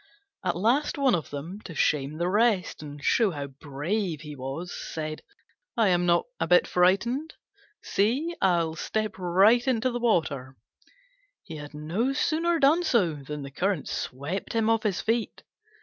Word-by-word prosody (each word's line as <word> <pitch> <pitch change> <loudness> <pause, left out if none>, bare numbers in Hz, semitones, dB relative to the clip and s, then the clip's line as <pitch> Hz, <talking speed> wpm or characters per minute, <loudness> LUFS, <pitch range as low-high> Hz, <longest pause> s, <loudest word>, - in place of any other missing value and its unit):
At 180 - 0
last 240 +12 +1
one 275 -3 +3
of 165 -5 -1
them, 160 +8 -6
to 165 - -9
shame 145 +1 +1
the 170 +1 0
rest, 205 -3 +1
and 145 -1 -9
show 225 -4 +3
how 145 -5 -4
brave 150 +5 -3
he 150 -2 -8
was, 135 +7 -5
said, 155 -1 -5 0.6
"I 220 -4 +4
am 175 -1 +2
not 170 0 +3
a - - 0
bit 180 +1 +5
frightened! 235 - +1 0.5
See, 265 +12 0
I'll 170 -4 +2
step 215 +3 -3
right 195 +8 +4
into 255 0 +1
the 240 - -3
water!" 150 - 0 0.9
He 160 - -8
had 150 0 -9
no 180 - -1
sooner 330 +4 +1
done 310 +3 +4
so 215 - +2
than 145 0 -7
the 135 - -8
current 180 +1 -1
swept 145 +9 -4
him 225 -1 +2
off 225 -1 +2
his 200 -5 -1
feet. 225 +1 -1
180 Hz, 165 wpm, -27 LUFS, 155-230 Hz, 0.9 s, bit